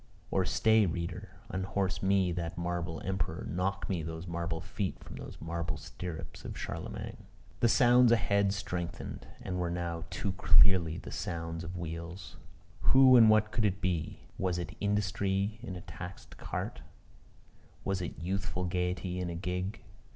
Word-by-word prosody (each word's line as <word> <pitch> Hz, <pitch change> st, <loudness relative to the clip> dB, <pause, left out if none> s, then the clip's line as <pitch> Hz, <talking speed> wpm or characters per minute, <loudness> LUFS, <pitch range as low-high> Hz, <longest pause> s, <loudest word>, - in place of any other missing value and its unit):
Or 95 Hz, -1 st, +2 dB
stay, 110 Hz, 0 st, +4 dB
reader, 85 Hz, 0 st, -4 dB, 0.2 s
unhorse 95 Hz, +1 st, -1 dB
me 95 Hz, -1 st, +3 dB
that 85 Hz, -1 st, -3 dB
marble 85 Hz, -1 st, -2 dB
emperor; 95 Hz, -3 st, -2 dB
knock 95 Hz, +2 st, -1 dB
me 90 Hz, -4 st, -1 dB
those 80 Hz, +1 st, -5 dB
marble 85 Hz, -1 st, -2 dB
feet 95 Hz, +1 st, -3 dB
from -, -, -9 dB
those -, -, -8 dB
marble 85 Hz, -2 st, -3 dB
stirrups 80 Hz, +2 st, -7 dB
of -, -, -6 dB
Charlemagne. -, -, -5 dB, 0.3 s
The 120 Hz, -, +4 dB
sounds 125 Hz, -1 st, +6 dB
ahead 100 Hz, -3 st, +3 dB
strengthened, 90 Hz, -4 st, -4 dB, 0.2 s
and 90 Hz, 0 st, -2 dB
were 90 Hz, -1 st, 0 dB
now 85 Hz, -1 st, -3 dB
too 100 Hz, -, -2 dB
clearly 95 Hz, -3 st, +5 dB
the -, -, -8 dB
sounds 80 Hz, 0 st, -3 dB
of 85 Hz, +2 st, -6 dB
wheels. 85 Hz, +2 st, -6 dB, 0.4 s
Who 130 Hz, -1 st, +7 dB
and 115 Hz, -3 st, +9 dB
what 110 Hz, 0 st, +4 dB
could 110 Hz, -, 0 dB
it 100 Hz, -1 st, +2 dB
be? 90 Hz, -5 st, -1 dB, 0.2 s
Was 90 Hz, -2 st, +1 dB
it 85 Hz, -, -4 dB
industry 100 Hz, 0 st, 0 dB
in 105 Hz, -7 st, -5 dB
a 90 Hz, -, -6 dB
taxed 85 Hz, +3 st, -9 dB
cart? -, -, -4 dB, 1.0 s
Was 95 Hz, -2 st, 0 dB
it 85 Hz, -, -4 dB
youthful 95 Hz, +2 st, -2 dB
gaiety 90 Hz, 0 st, -1 dB
in 90 Hz, -1 st, -2 dB
a 85 Hz, -, -3 dB
gig? 90 Hz, +3 st, -3 dB
90 Hz, 155 wpm, -32 LUFS, 85-100 Hz, 1.0 s, and